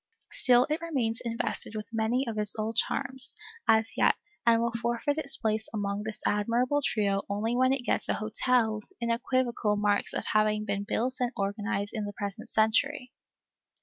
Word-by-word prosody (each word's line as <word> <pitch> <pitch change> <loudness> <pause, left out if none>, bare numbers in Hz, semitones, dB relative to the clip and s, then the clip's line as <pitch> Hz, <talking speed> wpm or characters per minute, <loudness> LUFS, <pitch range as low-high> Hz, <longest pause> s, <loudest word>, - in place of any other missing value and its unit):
Still 250 0 +4
it 310 - 0
remains 255 -9 -1
invested 230 -1 -3
with 215 -1 -4
many 225 +4 +1
of 225 - -3
its 210 +1 +6
old 220 +1 -2
charms, 260 +4 0 0.3
as 220 0 +3
yet, - - +4 0.3
and 230 -1 +6
will 235 0 0
forfeit 240 +6 0
its 275 -3 -1
place 220 -1 -1
among 200 -1 -2
this 215 0 -5
admirable 240 +7 +1
trio 200 -4 +1
only 215 +4 -1
when 255 +1 +3
it 265 -2 -1
gets - - 0
a - - +2
hotel 220 0 +1
with 210 - -20
unequivocal 235 -2 0
marks 205 0 +1
of - - -2
having 215 0 +2
been 200 0 -2
built 250 +4 -1
and 245 -1 0
organized 205 0 -2
in 215 -3 -3
the 205 - -6
present 200 +2 -6
century. 220 +3 +1
225 Hz, 175 wpm, -28 LUFS, 210-245 Hz, 0.3 s, its